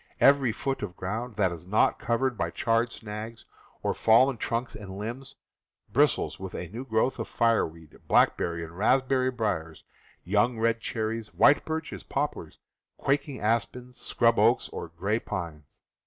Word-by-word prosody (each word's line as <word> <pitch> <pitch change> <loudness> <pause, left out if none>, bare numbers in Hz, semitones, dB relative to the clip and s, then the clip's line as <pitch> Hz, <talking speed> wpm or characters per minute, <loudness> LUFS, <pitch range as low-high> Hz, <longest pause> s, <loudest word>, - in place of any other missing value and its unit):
Every 140 -3 +5
foot 135 +4 -3
of 95 -4 -5
ground 110 +5 -4
that 95 -4 +2
is 85 +1 -9
not 105 +3 +2
covered 120 +2 0
by - - -1
charred 115 0 +1
snags, 110 +1 -7 0.4
or - - +1
fallen 120 +3 +4
trunks 115 +3 -2
and 95 -2 -8
limbs, 120 +6 -6 0.6
bristles 145 +5 +2
with 95 -1 -7
a 90 - -5
new 115 +7 -6
growth 110 +2 0
of - - -3
fireweed, 85 -9 0
blackberry 85 -1 +2
and 80 +1 -9
raspberry 130 +5 +2
briers, 105 -10 -3 0.4
young 105 +5 +2
red 115 0 +1
cherries, 110 -1 -3
white 145 - +5
birches, 160 0 -4
poplars, 140 - -3 0.4
quaking 140 0 -1
aspens, 120 +3 -1
scrub 115 -1 +2
oaks, - - +3
or - - -6
gray 100 +7 -1
pines. 80 -9 -7
115 Hz, 150 wpm, -27 LUFS, 95-125 Hz, 0.6 s, Every